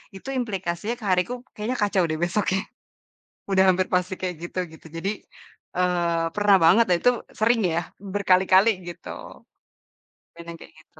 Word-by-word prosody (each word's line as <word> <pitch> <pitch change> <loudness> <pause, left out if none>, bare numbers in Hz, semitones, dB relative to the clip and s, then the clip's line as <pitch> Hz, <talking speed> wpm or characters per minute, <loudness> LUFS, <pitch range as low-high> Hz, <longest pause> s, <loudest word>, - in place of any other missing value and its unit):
itu 195 +8 -9
implikasinya 195 -1 -3
ke 220 - -9
hariku 185 +6 +1 0.2
kayaknya 225 +4 -3
kacau 200 -3 +2
deh 155 - -1
besoknya. 190 +1 0 0.9
Udah 190 -1 +4
hampir 185 0 +1
pasti 180 +1 0
kayak 180 -2 -3
gitu 175 +2 -6
gitu. 160 - -15
Jadi, 190 +4 -2 0.7
eee, 175 -2 +1
pernah 205 -1 +5
banget 220 +8 +6
dan 175 - +5
itu 245 - +5 0.3
sering 230 +2 +3
ya, 170 - +1 0.3
berkali-kali 190 +1 +4 0.2
gitu. 175 - -9 1.3
Bener 170 0 -8
kek - - -13
gitu. 160 0 -21
185 Hz, 145 wpm, -24 LUFS, 175-205 Hz, 1.3 s, banget